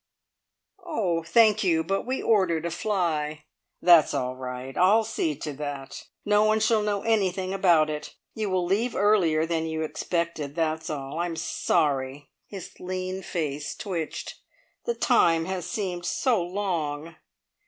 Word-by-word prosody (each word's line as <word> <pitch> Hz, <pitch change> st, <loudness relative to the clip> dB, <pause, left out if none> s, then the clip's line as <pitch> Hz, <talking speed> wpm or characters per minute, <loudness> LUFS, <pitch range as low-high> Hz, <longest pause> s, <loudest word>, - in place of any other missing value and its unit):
"Oh, 205 Hz, -, -1 dB
thank 215 Hz, +5 st, +4 dB
you, 165 Hz, -4 st, +2 dB
but 195 Hz, +7 st, -2 dB
we 260 Hz, +1 st, -2 dB
ordered 185 Hz, -7 st, +2 dB
a 170 Hz, -, -2 dB
fly." 160 Hz, -6 st, -1 dB, 0.4 s
"That's 170 Hz, -3 st, +6 dB
all 125 Hz, 0 st, -2 dB
right. 130 Hz, +1 st, -6 dB
I'll 205 Hz, +5 st, +5 dB
see 210 Hz, -8 st, -1 dB
to 150 Hz, +1 st, -5 dB
that. 140 Hz, -1 st, -6 dB, 0.2 s
No 210 Hz, 0 st, +4 dB
one 215 Hz, 0 st, +3 dB
shall 220 Hz, 0 st, +3 dB
know 205 Hz, -1 st, -1 dB
anything 190 Hz, -4 st, +1 dB
about 175 Hz, -5 st, +4 dB
it. 150 Hz, -1 st, -6 dB, 0.2 s
You 215 Hz, -2 st, -2 dB
will 185 Hz, -1 st, +1 dB
leave 210 Hz, +6 st, 0 dB
earlier 185 Hz, -6 st, +3 dB
than 165 Hz, -1 st, -1 dB
you 160 Hz, 0 st, -2 dB
expected 160 Hz, -2 st, -3 dB
that's 160 Hz, 0 st, -1 dB
all. 140 Hz, 0 st, -4 dB
I'm 175 Hz, -1 st, -1 dB
sorry" 145 Hz, -4 st, -1 dB, 0.2 s
his 195 Hz, -4 st, -9 dB
lean 185 Hz, +1 st, -4 dB
face 150 Hz, -5 st, -3 dB
twitched 170 Hz, -6 st, -5 dB, 0.5 s
"the 475 Hz, -, -1 dB
time 165 Hz, -, +3 dB
has 185 Hz, -1 st, -4 dB
seemed 180 Hz, -6 st, -3 dB
so 245 Hz, -8 st, +1 dB
long!" 170 Hz, -4 st, -3 dB
170 Hz, 145 wpm, -26 LUFS, 155-200 Hz, 0.5 s, That's